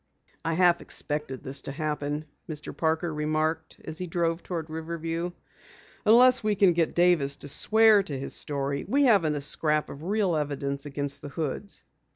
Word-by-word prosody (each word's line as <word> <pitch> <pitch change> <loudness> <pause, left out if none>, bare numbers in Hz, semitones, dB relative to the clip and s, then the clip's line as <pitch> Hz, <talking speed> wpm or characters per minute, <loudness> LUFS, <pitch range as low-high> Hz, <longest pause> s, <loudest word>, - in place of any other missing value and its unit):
"I 165 +1 -1
half 175 -1 +3
expected 145 -3 -1
this 135 +1 0
to - - -6
happen," 150 0 -3 0.2
Mr. 150 -1 -6
Parker 160 0 -1
remarked 155 +1 -2
as 155 - -3
he 180 - -4
drove 165 0 -1
toward 165 -3 -5
Riverview. 165 +1 -4 0.8
"Unless 250 +2 +6
we 210 -1 +1
can 190 -2 +4
get 165 -1 0
Davis 170 -6 +3
to - - -9
swear 220 +7 +5
to 145 -8 -5
his 135 - -3
story, 140 -1 0
we 285 +2 +2
haven't 195 - +3
a 145 - -3
scrap 150 +1 +1
of 140 - -10
real 195 0 0
evidence 140 -1 -3
against 140 0 0
the 145 - -8
Hoods." 160 +7 -5
160 Hz, 170 wpm, -26 LUFS, 145-175 Hz, 0.8 s, Unless